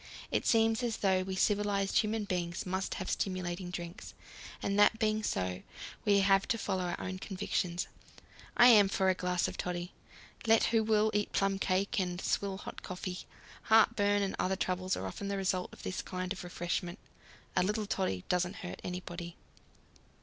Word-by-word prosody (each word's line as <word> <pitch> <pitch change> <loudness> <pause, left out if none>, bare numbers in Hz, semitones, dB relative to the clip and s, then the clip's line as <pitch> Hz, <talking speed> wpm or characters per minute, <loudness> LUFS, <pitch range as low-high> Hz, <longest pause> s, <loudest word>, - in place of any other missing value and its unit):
It - - 0
seems 225 0 +3
as 235 -2 -1
though 190 -2 +2
we 190 0 -4
civilized 200 0 +2
human 215 0 0
beings 175 -2 -2
must 190 +1 -2
have - - -4
stimulating 180 -1 -2
drinks, 175 +4 -7 0.4
and 200 +1 0
that 205 +2 +6
being 215 -1 +1
so, 90 - -2 0.4
we 200 -1 +5
have 195 0 +4
to 230 - +1
follow 190 -4 -1
our 175 - -3
own 185 0 -4
convictions. 185 -3 -2 0.7
I 240 - +8
am 205 -4 +7
for 190 -1 +2
a - - +4
glass 180 -1 0
of - - -6
toddy. 175 0 -3 0.5
Let 225 0 +5
who 225 -1 +3
will 215 0 +3
eat 210 0 0
plum 195 0 +1
cake 195 +4 +1
and 180 -1 -2
swill 195 0 -1
hot - - -8
coffee 180 0 -5 0.5
heartburn 205 -2 +4
and 195 - -2
other 190 +1 +1
troubles 185 0 -1
are - - -4
often 200 - -5
the 200 0 -1
result 185 -1 -1
of - - -13
this 185 - -3
kind 185 0 -4
of 195 - -8
refreshment. 175 +1 -3 0.6
A - - +4
little 210 +3 0
toddy 185 - -1
doesn't 180 +1 0
hurt 180 - -6
anybody. 175 -1 -6
190 Hz, 175 wpm, -32 LUFS, 180-205 Hz, 0.7 s, I